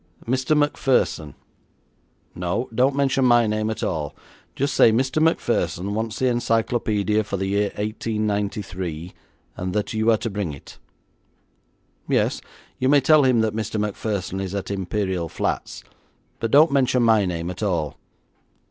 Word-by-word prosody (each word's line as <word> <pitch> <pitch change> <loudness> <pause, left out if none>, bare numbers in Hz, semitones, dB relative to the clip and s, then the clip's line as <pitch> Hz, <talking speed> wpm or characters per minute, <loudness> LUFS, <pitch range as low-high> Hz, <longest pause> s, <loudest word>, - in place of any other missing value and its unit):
Mr. 130 +5 +1
Macpherson. 130 - +1 1.0
No, 90 +8 -2
don't 130 +4 +2
mention 135 -1 +2
my 120 -2 +5
name 110 0 -1
at 110 - -4
all. 75 -5 -2 0.4
Just 140 -1 -1
say 115 - +6
Mr. 130 +6 +1
Macpherson 100 - 0
wants 110 0 -3
the 130 - 0
encyclopaedia 115 -3 +1
for 100 -1 -4
the 95 - -2
year 100 +1 +1
1893, 100 -5 -3 0.4
and 90 0 -4
that 105 +1 -2
you 110 +1 +1
are 110 - +5
to 115 0 -4
bring 100 -6 -3
it. 70 - -13 1.3
Yes, - - +1 0.4
you 130 - +2
may 145 0 +6
tell 145 +1 +5
him 125 -3 +4
that 110 -1 -1
Mr. 110 -1 -2
Macpherson 100 -2 -3
is 95 0 -4
at 100 0 -4
Imperial 95 -3 -2
Flats, - - -3 0.6
but 115 - -1
don't 150 +6 +6
mention 130 -3 +2
my 110 -3 +4
name 85 0 -3
at 90 - -9
all. 85 -8 -1
110 Hz, 150 wpm, -23 LUFS, 95-125 Hz, 1.3 s, say